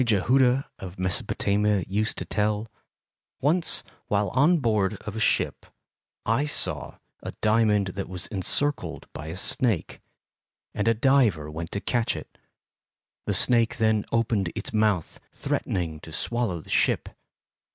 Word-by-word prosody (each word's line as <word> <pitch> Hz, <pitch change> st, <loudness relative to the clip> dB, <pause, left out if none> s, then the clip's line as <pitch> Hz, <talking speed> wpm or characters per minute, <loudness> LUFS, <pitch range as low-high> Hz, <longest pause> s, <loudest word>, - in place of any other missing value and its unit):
Jehudah 125 Hz, +4 st, +3 dB
of 95 Hz, -1 st, -8 dB
Mesopatamia 100 Hz, +2 st, 0 dB
used 105 Hz, +3 st, -1 dB
to -, -, -4 dB
tell: 105 Hz, +1 st, -1 dB, 0.7 s
Once 160 Hz, +5 st, +1 dB, 0.2 s
while 100 Hz, -1 st, +1 dB
on 145 Hz, -, +4 dB
board 110 Hz, -7 st, +1 dB
of 110 Hz, -, -6 dB
a -, -, -3 dB
ship, -, -, +1 dB, 0.6 s
I 125 Hz, +7 st, +1 dB
saw 150 Hz, -, +1 dB, 0.3 s
a -, -, -6 dB
diamond 105 Hz, -3 st, +2 dB
that 95 Hz, +1 st, -5 dB
was 90 Hz, -2 st, -4 dB
encircled 100 Hz, -, 0 dB
by 75 Hz, -, -7 dB
a 80 Hz, +3 st, -6 dB
snake, 110 Hz, -1 st, +1 dB, 0.7 s
and 105 Hz, +1 st, -1 dB
a 115 Hz, -, +4 dB
diver 110 Hz, -, +2 dB
went 80 Hz, +2 st, -6 dB
to 100 Hz, -, -2 dB
catch 120 Hz, -2 st, 0 dB
it. -, -, -10 dB, 0.9 s
The -, -, 0 dB
snake 115 Hz, -2 st, +2 dB
then 110 Hz, -1 st, +2 dB
opened 110 Hz, -6 st, +1 dB
its -, -, -5 dB
mouth, 105 Hz, -6 st, +1 dB
threatening 80 Hz, -4 st, -2 dB
to 80 Hz, -, -12 dB
swallow 100 Hz, +1 st, -1 dB
the -, -, -17 dB
ship. -, -, +2 dB
105 Hz, 140 wpm, -26 LUFS, 95-115 Hz, 0.9 s, on